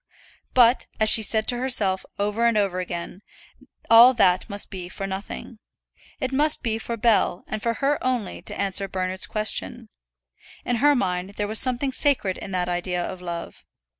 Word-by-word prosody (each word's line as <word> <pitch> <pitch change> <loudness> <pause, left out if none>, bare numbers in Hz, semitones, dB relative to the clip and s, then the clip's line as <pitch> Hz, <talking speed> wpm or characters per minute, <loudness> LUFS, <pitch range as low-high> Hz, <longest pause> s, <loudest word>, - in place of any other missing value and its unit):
But, 245 0 +4
as 215 0 +4
she 225 - +7
said 220 +1 +2
to 245 - 0
herself 210 -7 +2
over 210 +3 0
and 230 -2 +1
over 195 -3 0
again, 180 +1 -6 0.7
all 235 +3 +7
that 185 -2 +2
must 200 0 -2
go 180 -2 -7
for 195 - -6
nothing. 195 +4 -7 0.6
It 260 - -3
must 295 +3 +1
be 225 -1 -2
for 230 +1 -5
Bell, 215 -5 +1
and 215 - -6
for 230 +1 -1
her 280 +4 -1
only, 250 -6 -3
to - - -7
answer 195 0 0
Bernard's 185 0 -2
question. 215 - -2 0.8
In 245 - -1
her 290 +4 +4
mind 185 -3 -3
there 205 0 -2
was 215 +1 +4
something 255 +1 +1
sacred 255 -9 0
in - - -8
that 180 -2 -2
idea 175 0 -2
of 185 - -7
love. 170 -1 -7
210 Hz, 175 wpm, -23 LUFS, 185-240 Hz, 0.8 s, she